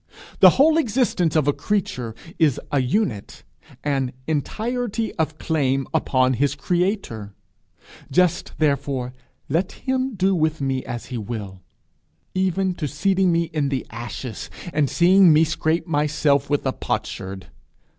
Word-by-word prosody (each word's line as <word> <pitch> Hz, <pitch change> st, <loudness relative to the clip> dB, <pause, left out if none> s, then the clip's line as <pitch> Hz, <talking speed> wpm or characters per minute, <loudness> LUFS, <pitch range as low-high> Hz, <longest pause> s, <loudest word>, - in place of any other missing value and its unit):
The -, -, +10 dB
whole 310 Hz, +4 st, +5 dB
existence 220 Hz, -, +1 dB
of 155 Hz, -3 st, +3 dB
a 145 Hz, -, +4 dB
creature 140 Hz, -, -2 dB, 0.2 s
is 150 Hz, -6 st, +3 dB
a 140 Hz, -2 st, +2 dB
unit, 130 Hz, -, -2 dB, 0.4 s
an 135 Hz, -3 st, -1 dB
entirety 225 Hz, -, -2 dB
of 160 Hz, -1 st, -1 dB
claim 135 Hz, -5 st, 0 dB
upon 130 Hz, -1 st, +2 dB
his 140 Hz, +3 st, +1 dB
creator: 175 Hz, -, -2 dB, 0.7 s
just 180 Hz, +4 st, +1 dB
therefore, 140 Hz, -4 st, 0 dB, 0.3 s
let 170 Hz, +6 st, 0 dB
him 260 Hz, -2 st, -2 dB
do 190 Hz, +1 st, +2 dB
with 160 Hz, -2 st, +1 dB
me 135 Hz, -2 st, -1 dB
as 120 Hz, -1 st, -5 dB
he 120 Hz, -, -2 dB
will 100 Hz, -4 st, -6 dB, 0.7 s
even 190 Hz, 0 st, +1 dB
to 150 Hz, -, 0 dB
seating 185 Hz, +6 st, +1 dB
me 170 Hz, 0 st, +2 dB
in 145 Hz, -3 st, 0 dB
the 135 Hz, -3 st, -2 dB
ashes, 115 Hz, 0 st, -6 dB, 0.2 s
and 145 Hz, -3 st, +2 dB
seeing 185 Hz, +1 st, +6 dB
me 155 Hz, +1 st, +6 dB
scrape 160 Hz, +1 st, 0 dB
myself 145 Hz, -2 st, +1 dB
with 145 Hz, -1 st, 0 dB
a 130 Hz, -, +1 dB
potsherd! 95 Hz, -4 st, -4 dB
150 Hz, 135 wpm, -22 LUFS, 130-185 Hz, 0.7 s, The